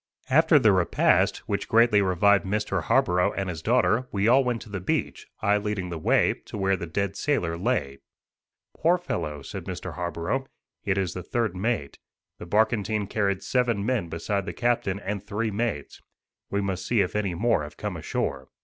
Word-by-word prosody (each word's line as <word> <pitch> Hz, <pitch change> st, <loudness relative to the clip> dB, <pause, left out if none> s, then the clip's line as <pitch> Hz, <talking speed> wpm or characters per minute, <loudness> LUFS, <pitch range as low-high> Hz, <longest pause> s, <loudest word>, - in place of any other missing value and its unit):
After 160 Hz, +3 st, +6 dB
the 115 Hz, -7 st, +5 dB
repast, 90 Hz, -3 st, +2 dB
which -, -, -2 dB
greatly 115 Hz, -2 st, +5 dB
revived 100 Hz, +2 st, +3 dB
Mr. 105 Hz, +2 st, -1 dB
Harborough 90 Hz, 0 st, +2 dB
and 95 Hz, -1 st, -3 dB
his 80 Hz, -3 st, -5 dB
daughter, 125 Hz, +3 st, +2 dB
we 100 Hz, +1 st, +1 dB
all 130 Hz, +3 st, +5 dB
went 125 Hz, -2 st, -2 dB
to -, -, -14 dB
the 100 Hz, -2 st, -4 dB
beach, 90 Hz, -, -2 dB
I 105 Hz, 0 st, +3 dB
leading 105 Hz, -3 st, -3 dB
the 85 Hz, -, -4 dB
way, -, -, +3 dB
to -, -, -7 dB
where 95 Hz, -1 st, +2 dB
the 85 Hz, -2 st, -6 dB
dead 100 Hz, +4 st, -2 dB
sailor 100 Hz, -, 0 dB
lay. 85 Hz, -, -1 dB, 0.8 s
"Poor 170 Hz, +3 st, +3 dB
fellow," 75 Hz, -, -4 dB
said -, -, -7 dB
Mr. -, -, -6 dB
Harborough, 90 Hz, +9 st, -3 dB, 0.4 s
"it 100 Hz, -2 st, 0 dB
is 95 Hz, -4 st, -1 dB
the 90 Hz, -, -5 dB
third 110 Hz, 0 st, -1 dB
mate. 100 Hz, -7 st, -2 dB, 0.4 s
The 85 Hz, -, -8 dB
barkentine 105 Hz, +1 st, +1 dB
carried 100 Hz, -2 st, 0 dB
seven 115 Hz, -3 st, 0 dB
men 115 Hz, -8 st, -1 dB
beside 95 Hz, +4 st, -2 dB
the -, -, -3 dB
captain 120 Hz, -5 st, 0 dB
and 100 Hz, 0 st, -4 dB
three 105 Hz, +2 st, -2 dB
mates. 105 Hz, -9 st, -3 dB, 0.5 s
We 100 Hz, -, 0 dB
must 95 Hz, -2 st, -2 dB
see 115 Hz, -4 st, +3 dB
if 90 Hz, -, -2 dB
any 100 Hz, -4 st, -1 dB
more 110 Hz, -2 st, +2 dB
have 75 Hz, 0 st, -8 dB
come -, -, -4 dB
ashore." 65 Hz, -2 st, -3 dB
100 Hz, 185 wpm, -26 LUFS, 90-115 Hz, 0.8 s, After